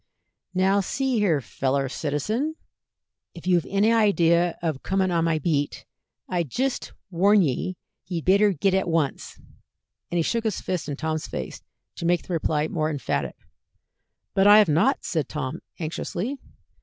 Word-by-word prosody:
"Now 190 +2 +3
see 255 +5 0
here, 170 -9 +2
feller 135 +2 -1
citizen, 210 - -2 0.8
if 170 - -11
you've 175 -3 +2
any 205 +3 +3
idea 175 -6 +3
of 155 -5 -1
comin' 190 -1 0
on 170 -1 +2
my 165 -1 +2
beat, 145 -2 -1 0.4
I 175 -1 0
jist 250 - -2 0.2
warn 195 +3 +4
ye 170 +5 -2 0.3
ye'd 170 -3 -4
better 200 +2 +5
git 190 +2 +1
at 190 -1 +1
once," 160 -5 -1 0.7
and 175 - -1
he 165 - +2
shook 230 +6 0
his 215 -4 0
fist 180 -5 -3
in 145 - -2
Tom's 155 0 -2
face 65 - -6 0.4
to 170 - -2
make 175 -1 +2
the 180 - -5
reply 155 -2 0
more 155 -2 -1
emphatic. 145 -3 -2 1.0
"But 195 0 +4
I 205 +1 +9
have 210 -2 +6
not," 190 - +2
said 160 -6 -1
Tom, 150 +1 -4 0.2
anxiously. 180 - -4
175 Hz, 155 wpm, -25 LUFS, 155-200 Hz, 1.0 s, I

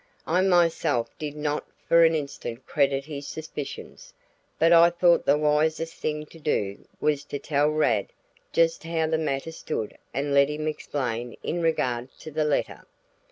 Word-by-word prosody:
I 180 +3 +2
myself 165 -8 +2
did 150 -1 -4
not 150 0 -2 0.2
for 170 0 +6
an 165 0 +5
instant 140 -4 -5
credit 140 -2 +1
his 145 -2 -7
suspicions, 150 -3 -8 0.4
but 165 +1 +5
I 170 0 +8
thought 175 0 +3
the 140 - +5
wisest 155 +2 +1
thing 150 0 -3
to 165 - -15
do 100 -10 -2
was 145 -1 +1
to 145 - -4
tell 145 +1 +1
Rad 120 -10 +1 0.4
just 165 0 +2
how 165 -1 0
the 160 0 0
matter 150 0 -2
stood 135 -9 -4 0.2
and 140 +2 -2
let 140 0 +5
him 155 +1 -3
explain 125 -6 -3
in 175 - -2
regard 125 -7 0
to 155 - -8
the 155 +1 0
letter. 150 - -1
150 Hz, 160 wpm, -26 LUFS, 140-160 Hz, 0.4 s, I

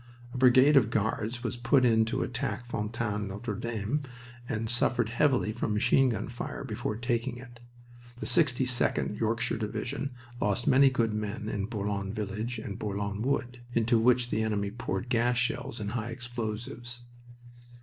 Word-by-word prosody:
A - - -4
brigade 130 +3 +6
of 115 -5 +5
Guards 110 +2 -1
was 120 - -2
put 120 +2 +3
in 110 -2 +4
to 130 +4 -1
attack 120 -2 -3
Fontaine 105 -2 -2
Notre 105 +3 -4
Dame, 115 +6 -2 0.5
and 110 0 -1
suffered 120 0 +2
heavily 125 -2 +2
from 110 -2 -2
machine 130 +5 +4
gun 115 - -2
fire 120 +1 -5
before 110 -3 -3
taking 120 +1 -1
it. 120 -1 -12 0.6
The - - -4
62d 125 -7 +2
(Yorkshire) 115 0 0
Division 125 +5 -3 0.3
lost 105 +3 +1
many 135 +1 +6
good 115 -4 0
men 105 0 -3
in 100 -2 -2
Bourlon 100 -3 -3
Village 110 +3 -3
and 105 -2 -6
Bourlon 100 0 -3
Wood, 125 -1 -1 0.2
into 115 0 +3
which 120 +1 +3
the 110 - +1
enemy 105 -2 -1
poured 110 -1 -3
gas 120 0 +2
shells 120 -1 -1
and 105 -1 -3
high 115 -1 -3
explosives. 120 0 -5
115 Hz, 155 wpm, -29 LUFS, 105-125 Hz, 0.6 s, brigade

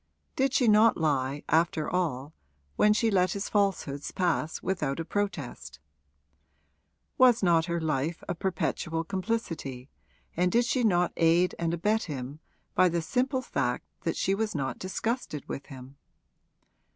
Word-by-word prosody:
Did 270 0 +2
she 250 - +3
not 215 +1 +5
lie, 140 -3 0
after 160 -1 +2
all, 155 -5 -2 0.4
when 210 - +4
she 220 +1 +2
let 185 -2 +2
his 200 - -3
falsehoods 190 -9 0
pass 170 -4 -1
without 160 -6 -1
a 165 - -3
protest? 195 - -4 1.4
Was 245 -4 +6
not 165 -3 +4
her 170 0 -1
life 155 +1 -2
a - - -1
perpetual 165 -2 -2
complicity, 170 - -4 0.4
and 180 +1 +2
did 235 +4 +3
she 245 +1 0
not 180 -5 +2
aid 170 +2 +3
and 165 -1 0
abet 210 +6 0
him 140 -1 -6 0.3
by 185 0 +4
the 170 -1 -1
simple 255 - 0
fact 125 - -2 0.2
that 165 - -2
she 195 - +1
was 215 0 -1
not 135 -2 -2
disgusted 190 - -3
with 140 - -6
him? 135 -1 -11
170 Hz, 145 wpm, -28 LUFS, 150-205 Hz, 1.4 s, Was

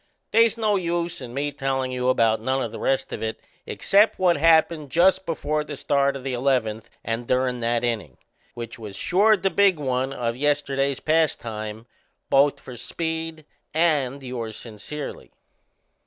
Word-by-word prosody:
They's 230 0 +4
no 215 -3 +2
use 170 -1 -2
in 125 -2 -7
me 140 +3 -2
tellin' 135 -2 -2
you 125 0 0
about 115 -3 +3
none 130 +3 0
o' - - -1
the - - -9
rest 135 - 0
of - - -5
it 110 0 -3 0.3
except 205 +3 +3
what 180 -2 +3
happened 160 -1 +3
just 185 +5 +3
before 155 -2 -1
the 150 -1 -7
start 140 0 +1
o' 135 - -6
the 135 -1 -3
eleventh 120 -4 0
and 115 +1 -3
durin' 125 -1 +1
that 120 0 0
innin', 105 - -2 0.4
which 120 +1 -7
was 105 -3 -8
sure 210 +4 +3
the 195 0 0
big 200 -4 +4
one 130 -2 -1
o' 120 -3 -2
yesterday's 140 0 0
pastime 115 -9 -1 0.5
both 140 +1 +4
for 125 -2 -10
Speed 160 +2 -4 0.3
and 140 -5 +1
yours 120 -4 -5
sincerely. 120 +6 -7
135 Hz, 160 wpm, -24 LUFS, 120-160 Hz, 0.5 s, They's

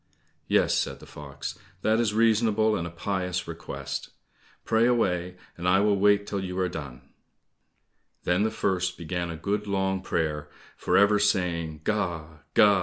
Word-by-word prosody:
"Yes," - - +3
said - - -1
the - - -13
fox, 70 -1 -8 0.2
"that 110 +1 +3
is 115 -3 +2
reasonable, 110 -1 +3
and 85 - -2
a - - -6
pious 90 +1 -2
request. 70 -5 -6 0.6
Pray 115 +1 +3
away, 90 -7 +1 0.2
I 90 +2 +3
will 105 0 +3
wait 100 0 +4
till 100 -2 -3
you 90 0 -4
are 95 -1 +1
done." 70 -7 -8 1.1
Then 90 +2 +2
the 110 - +2
first 95 -5 -1
began 85 +1 -3
a 85 - -5
good 105 +4 -2
long 95 -1 0
prayer, 75 -5 -2 0.3
for - - +1
ever 100 +1 +5
saying, 85 -6 0
"Ga! 85 -7 -2
90 Hz, 150 wpm, -27 LUFS, 85-105 Hz, 1.1 s, ever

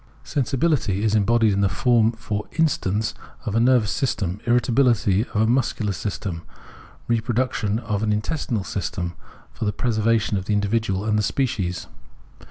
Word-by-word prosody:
Sensibility 135 - 0
is 110 -1 +2
embodied 110 0 +3
in 100 - +1
the 100 - +3
form 115 +1 +3
for 105 -2 -4
instance 115 - 0 0.3
of 105 - -2
a 115 - +2
nervous 120 -3 +3
system, 105 - -1
irritability, 120 -4 +3
of - - -19
a - - +4
muscular 120 -3 +1
system, 95 -2 -4 0.7
re 115 -1 +2
production, 115 -3 0
of 105 -3 -2
an 110 -1 +1
intestinal 110 0 -1
system 90 -3 -3 0.4
for - - -5
tte 105 - 0
preser 115 -3 0
vation 110 -2 +2
of 95 - -8
the 105 - 0
individual 105 -1 0
and 105 -1 +2
the - - +3
species. 100 -6 -1
110 Hz, 160 wpm, -23 LUFS, 100-120 Hz, 0.7 s, a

